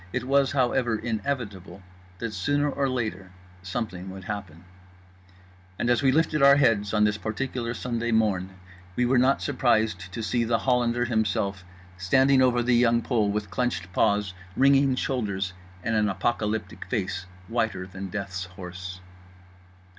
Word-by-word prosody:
It -, -, -2 dB
was, 135 Hz, +1 st, +2 dB
however, 125 Hz, -3 st, +1 dB
inevitable 110 Hz, -5 st, -4 dB, 0.3 s
that 115 Hz, +1 st, -4 dB
sooner 145 Hz, +10 st, 0 dB
or 135 Hz, 0 st, 0 dB
later 110 Hz, -7 st, -3 dB, 0.3 s
something 95 Hz, -1 st, -4 dB
would 95 Hz, 0 st, -9 dB
happen—and 95 Hz, +1 st, -9 dB
as 120 Hz, -, +2 dB
we 135 Hz, -2 st, +4 dB
lifted 155 Hz, +1 st, +2 dB
our 140 Hz, 0 st, +8 dB
heads 115 Hz, -8 st, +2 dB
on 105 Hz, -1 st, +3 dB
this 105 Hz, 0 st, +1 dB
particular 115 Hz, +2 st, -3 dB
Sunday 120 Hz, -1 st, -2 dB
morn 105 Hz, -5 st, +1 dB, 0.5 s
we 125 Hz, -, +2 dB
were 125 Hz, +1 st, +3 dB
not 130 Hz, +2 st, +3 dB
surprised 110 Hz, -, +1 dB
to 110 Hz, +5 st, -5 dB
see 120 Hz, +2 st, 0 dB
The 115 Hz, 0 st, +1 dB
Hollander 120 Hz, -1 st, +1 dB
himself 100 Hz, -4 st, -1 dB, 0.4 s
standing 130 Hz, +8 st, +4 dB
over 125 Hz, -2 st, +3 dB
The 125 Hz, +1 st, +2 dB
Young 120 Hz, -1 st, +3 dB
Pole, 110 Hz, -5 st, +1 dB
with 105 Hz, -1 st, -3 dB
clenched 95 Hz, -5 st, -2 dB
paws, 100 Hz, -1 st, +2 dB, 0.2 s
wringing 135 Hz, 0 st, +4 dB
shoulders, 100 Hz, -8 st, -2 dB, 0.3 s
and 115 Hz, -, -1 dB
an 105 Hz, -1 st, +2 dB
apocalyptic 105 Hz, +2 st, -2 dB
face 95 Hz, -5 st, -3 dB, 0.2 s
whiter 110 Hz, -5 st, -1 dB
than 95 Hz, +1 st, -7 dB
Death's 95 Hz, -1 st, -4 dB
horse. 95 Hz, +1 st, -8 dB
110 Hz, 145 wpm, -26 LUFS, 95-125 Hz, 0.5 s, our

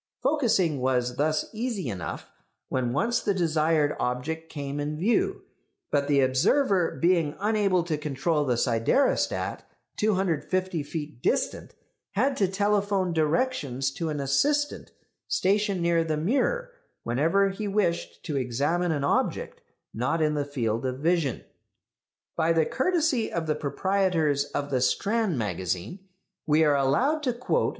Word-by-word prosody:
Focusing 225 Hz, -, +2 dB
was 125 Hz, -1 st, 0 dB
thus 155 Hz, +1 st, +1 dB
easy 220 Hz, -, -3 dB
enough 90 Hz, -9 st, -5 dB, 0.4 s
when 125 Hz, -2 st, -1 dB
once 230 Hz, -, +1 dB
the 200 Hz, -, 0 dB
desired 155 Hz, -3 st, +2 dB
object 160 Hz, +7 st, -3 dB
came 140 Hz, -1 st, -5 dB
in 150 Hz, +1 st, -3 dB
view; 210 Hz, +9 st, +1 dB, 0.5 s
but 140 Hz, 0 st, +1 dB
the 140 Hz, -1 st, +3 dB
observer 175 Hz, -, +2 dB
being 170 Hz, -4 st, +2 dB
unable 200 Hz, -3 st, +2 dB
to 160 Hz, -3 st, -2 dB
control 150 Hz, +1 st, 0 dB
the 125 Hz, -4 st, +1 dB
siderostat, 120 Hz, -, +1 dB, 0.4 s
250 185 Hz, -3 st, 0 dB
feet 150 Hz, -3 st, -6 dB
distant, -, -, -1 dB, 0.4 s
had 265 Hz, +7 st, +1 dB
to 200 Hz, -6 st, +2 dB
telephone 200 Hz, -1 st, +1 dB
directions 150 Hz, -, 0 dB
to 160 Hz, +4 st, -3 dB
an 150 Hz, -1 st, -3 dB
assistant 290 Hz, -, 0 dB, 0.4 s
stationed 200 Hz, -1 st, +1 dB
near 170 Hz, -1 st, +3 dB
the 155 Hz, -1 st, -1 dB
mirror 280 Hz, -, 0 dB, 0.3 s
whenever 165 Hz, +12 st, +2 dB
he 205 Hz, +2 st, -4 dB
wished 195 Hz, -4 st, -1 dB
to 155 Hz, -, -4 dB
examine 145 Hz, +8 st, 0 dB
an 145 Hz, -3 st, -1 dB
object 140 Hz, -, -1 dB, 0.3 s
not 130 Hz, +8 st, 0 dB
in 155 Hz, -1 st, +2 dB
the 145 Hz, -1 st, 0 dB
field 115 Hz, -5 st, -2 dB
of 130 Hz, -1 st, -2 dB
vision. 160 Hz, -3 st, 0 dB, 0.9 s
By 165 Hz, 0 st, +2 dB
the 160 Hz, -1 st, +3 dB
courtesy 300 Hz, -, +1 dB
of 165 Hz, -1 st, -2 dB
the 155 Hz, -, +1 dB
proprietors 160 Hz, -2 st, 0 dB
of 145 Hz, 0 st, -4 dB
the 130 Hz, -2 st, +1 dB
Strand 205 Hz, -, +1 dB
Magazine 95 Hz, -, -3 dB, 0.5 s
we 155 Hz, +1 st, +4 dB
are 150 Hz, -2 st, +4 dB
allowed 240 Hz, -, +2 dB
to 255 Hz, -4 st, 0 dB
quote 240 Hz, +2 st, 0 dB
M. -, -, +1 dB
160 Hz, 140 wpm, -26 LUFS, 140-200 Hz, 0.9 s, we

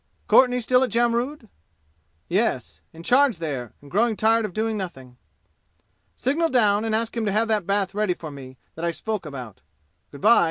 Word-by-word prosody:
"Courtenay 250 Hz, -1 st, +5 dB
still 250 Hz, +2 st, +3 dB
at 255 Hz, -, 0 dB
Jamrud?" 240 Hz, +3 st, 0 dB, 0.8 s
"Yes. -, -, -1 dB
In 165 Hz, +1 st, -12 dB
charge 255 Hz, 0 st, +4 dB
there 140 Hz, -8 st, -5 dB
and 140 Hz, -, -14 dB
growing 220 Hz, +3 st, +2 dB
tired 225 Hz, +1 st, +3 dB
of 200 Hz, -, -6 dB
doing 220 Hz, 0 st, -1 dB
nothing." 135 Hz, -11 st, -7 dB, 1.0 s
"Signal 320 Hz, +6 st, 0 dB
down 215 Hz, -6 st, +3 dB
and 220 Hz, -1 st, 0 dB
ask 225 Hz, +1 st, -2 dB
him 230 Hz, -, -1 dB
to -, -, +1 dB
have 220 Hz, +3 st, +1 dB
that 210 Hz, -5 st, 0 dB
bath 200 Hz, -1 st, 0 dB
ready 205 Hz, -3 st, 0 dB
for 155 Hz, -3 st, -8 dB
me 130 Hz, -2 st, -11 dB, 0.2 s
that 165 Hz, -, -8 dB
I 170 Hz, -, +1 dB
spoke 205 Hz, +1 st, -4 dB
about. 125 Hz, -8 st, -9 dB, 0.5 s
Good 140 Hz, -, -12 dB
by." 230 Hz, +2 st, +6 dB
215 Hz, 185 wpm, -24 LUFS, 165-235 Hz, 1.0 s, by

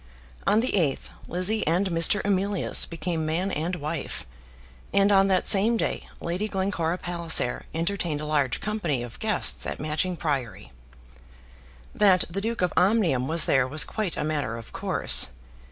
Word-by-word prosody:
On 210 Hz, +3 st, +4 dB
the 255 Hz, -, -1 dB
8th 160 Hz, -9 st, -1 dB, 0.2 s
Lizzie 185 Hz, +4 st, +1 dB
and 180 Hz, +4 st, +1 dB
Mr. 170 Hz, +5 st, +4 dB
Emilius 200 Hz, -1 st, +2 dB
became 165 Hz, 0 st, -3 dB
man 170 Hz, +5 st, -1 dB
and 170 Hz, +3 st, -2 dB
wife, 155 Hz, -2 st, -5 dB, 0.7 s
and 200 Hz, +1 st, +3 dB
on 195 Hz, -1 st, +4 dB
that 190 Hz, -2 st, +1 dB
same 215 Hz, +4 st, +5 dB
day -, -, -3 dB
Lady 180 Hz, +5 st, -3 dB
Glencora 190 Hz, -4 st, -2 dB
Palliser 170 Hz, -8 st, +1 dB
entertained 165 Hz, -2 st, -2 dB
a 150 Hz, -, -5 dB
large 145 Hz, -5 st, 0 dB
company 175 Hz, -, -2 dB
of 120 Hz, -1 st, -10 dB
guests 215 Hz, -1 st, 0 dB
at -, -, -5 dB
Matching 155 Hz, +4 st, -2 dB
Priory. 125 Hz, -, -4 dB, 1.2 s
That 190 Hz, -4 st, +4 dB
the 195 Hz, +3 st, -3 dB
Duke 225 Hz, -2 st, -2 dB
of 180 Hz, -, 0 dB
Omnium 180 Hz, -, +2 dB
was 160 Hz, 0 st, +3 dB
there 135 Hz, -2 st, +2 dB
was 150 Hz, +3 st, +3 dB
quite 210 Hz, -6 st, -3 dB
a -, -, -2 dB
matter 145 Hz, -7 st, -2 dB
of 115 Hz, -, -12 dB
course. -, -, +2 dB
175 Hz, 155 wpm, -25 LUFS, 150-195 Hz, 1.2 s, same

